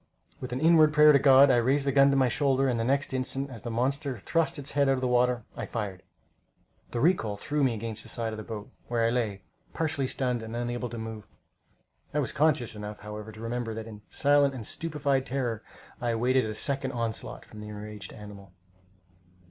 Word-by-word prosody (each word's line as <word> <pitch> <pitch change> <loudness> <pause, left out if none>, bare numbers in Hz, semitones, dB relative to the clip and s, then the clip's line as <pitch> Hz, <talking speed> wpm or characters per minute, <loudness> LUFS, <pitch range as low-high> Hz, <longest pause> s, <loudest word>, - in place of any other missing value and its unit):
With 130 - -6
an 125 - -2
inward 155 -1 +5
prayer 150 0 +8
to 140 - +5
God, 135 0 +7
I 125 - +4
raised 135 +4 +2
the 140 - +2
gun 140 +1 +6
to 140 - +2
my 130 -2 +4
shoulder, 135 +1 +2
and 120 -3 0
the - - 0
next 135 +3 0
instant, 135 +1 -2
as 115 -5 -8
the 120 - -5
monster 130 +3 -1
thrust 165 +11 0
its 140 -1 -3
head 140 -1 +2
out - - +5
of 130 - -4
the 130 - +1
water, 125 -1 +2
I - - -5
fired. 100 -5 -4 0.9
The 120 - -3
recoil 115 - +2
threw 145 +7 -1
me 125 -4 +2
against 110 0 -5
the - - -9
side 115 -2 -2
of - - -6
the 110 - -6
boat, 105 -1 -7 0.2
where 115 -1 +1
I 115 - +2
lay, 110 -6 -1 0.3
partially 150 -4 -1
stunned 125 -2 -1
and 110 +1 -7
unable 120 0 -3
to 120 - -7
move. 110 -2 -7 0.9
I - - +2
was 145 -4 0
conscious 150 -6 +2
enough, 105 0 -7
however, 105 +1 -7
to 110 - -12
remember, 115 0 -3
and 110 0 -6
in 105 -2 -10
silent, 140 -4 +2
stupefied 140 -2 -1
terror 125 -5 -2 0.4
I 120 - 0
awaited 125 +2 +2
a 110 -1 -4
second 135 +2 -2
onslaught 115 -2 -3
from 110 - -12
the 105 - -8
enraged 105 0 -8
animal. 100 -3 -11
125 Hz, 210 wpm, -28 LUFS, 110-140 Hz, 0.9 s, prayer